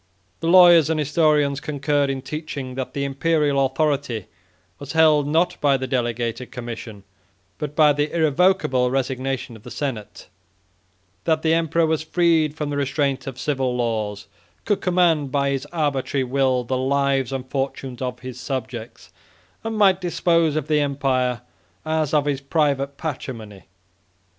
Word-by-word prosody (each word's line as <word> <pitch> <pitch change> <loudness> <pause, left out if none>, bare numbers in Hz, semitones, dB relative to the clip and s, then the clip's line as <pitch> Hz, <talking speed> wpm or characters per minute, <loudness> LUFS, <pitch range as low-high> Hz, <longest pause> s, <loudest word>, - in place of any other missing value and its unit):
The 165 - -3
lawyers 175 -3 +7
and 160 -1 0
historians 150 -1 +2
concurred 145 -1 0
in 135 -1 -3
teaching, 140 -2 -6
that 130 0 -5
the 140 - -1
Imperial 145 0 +1
authority 135 - -1 0.5
was 140 +1 -7
held, 155 -3 +4
not 165 +4 +1
by 140 -2 +3
the 130 - -4
delegated 120 -1 -2
commission, 115 -4 -7 0.6
but 150 -1 -5
by 150 -1 +5
the 145 +1 -1
irrevocable 160 -5 +2
resignation 130 -1 -2
of 110 - -13
the - - -11
senate; 125 -8 -5 1.0
that 160 -1 +1
the 160 0 +3
emperor 165 0 +2
was 160 -1 0
freed 160 -2 +2
from 150 -2 -3
the 145 - -2
restraint 140 -1 -1
of 130 -2 -6
civil 130 -4 -1
laws, 110 -4 -2 0.4
could 205 - 0
command 170 -6 +2
by 140 0 +1
his 135 +1 -3
arbitrary 140 -4 -1
will 130 -1 +1
the 130 +2 -2
lives 135 -1 +1
and 130 -1 -4
fortunes 135 -2 -3
of 125 -1 -4
his 130 -1 -8
subjects, 120 -8 -6 0.5
and 225 -1 -3
might 195 -3 +4
dispose 170 -3 +1
of 155 -2 -2
the 150 -1 +2
empire 130 -4 0 0.4
as 155 -2 0
of 150 -2 +2
his 140 -2 -1
private 140 -1 0
patrimony. 115 - -6
140 Hz, 150 wpm, -22 LUFS, 130-155 Hz, 1.0 s, lawyers